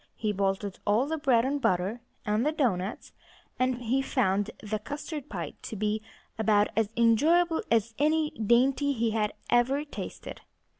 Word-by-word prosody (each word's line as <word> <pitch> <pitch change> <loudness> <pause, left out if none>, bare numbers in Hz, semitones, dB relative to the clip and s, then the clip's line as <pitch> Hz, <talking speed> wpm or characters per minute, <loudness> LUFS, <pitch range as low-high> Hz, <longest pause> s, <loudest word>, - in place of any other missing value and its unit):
He 215 -1 -1
bolted 195 0 -1
all 215 +5 +2
the 320 +2 -3
bread 255 -5 +3
and 280 +1 -1
butter, 190 +3 0 0.2
and 210 +2 +1
the 300 - +2
doughnuts; 215 - -1 0.5
and 255 -1 0
he 255 +4 +1
found 205 -7 +1
the 215 0 -2
custard 290 +4 -6
pie 170 -7 -5
to - - -6
be 215 +1 -1 0.4
about 210 -2 +3
as 220 -2 +1
enjoyable 320 +9 +4
as 230 0 +2
any 310 +1 +2
dainty 255 +6 +2
he 230 -3 0
had 215 -1 0 0.2
ever 265 +5 +3
tasted. 290 - -8
230 Hz, 155 wpm, -28 LUFS, 210-280 Hz, 0.5 s, enjoyable